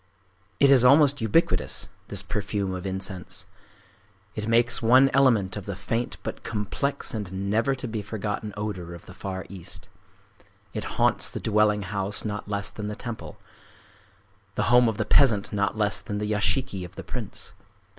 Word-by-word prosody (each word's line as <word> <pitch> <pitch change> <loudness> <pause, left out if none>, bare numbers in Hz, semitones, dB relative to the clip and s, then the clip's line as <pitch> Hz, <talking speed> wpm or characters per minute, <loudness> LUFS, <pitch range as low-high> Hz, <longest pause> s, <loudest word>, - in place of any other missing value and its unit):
It 140 -1 +6
is 130 -3 +6
almost 140 +1 +6
ubiquitous,—this 110 - 0
perfume 100 0 -2
of 90 +1 -4
incense. 95 -2 -4 0.9
It 105 0 -4
makes 115 +1 +3
one 130 +4 +6
element 120 -9 +4
of 105 -2 -6
the 100 - -3
faint 115 +6 -2
but - - -5
complex 110 +6 -2
and 100 -2 -3
never 115 +6 +2
to 130 -1 -5
be 110 -2 -3
forgotten 105 0 -4
odor 90 -5 -4
of 85 - -13
the - - -11
Far 95 -1 -5
East. 95 -4 -8 0.8
It - - -3
haunts - - +2
the - - -5
dwelling 105 -1 +2
house 100 +3 -2
not 105 -1 -4
less 100 -1 -2
than 105 -1 -5
the 105 - -4
temple,—the 110 -11 -7 1.3
home 125 0 +5
of 110 - -3
the - - 0
peasant 110 -9 +4
not 100 +1 0
less 105 -2 +1
than 105 0 -4
the 105 - -2
yashiki 100 +1 0
of 90 - -10
the - - -7
prince. - - -6
105 Hz, 160 wpm, -26 LUFS, 100-115 Hz, 1.3 s, It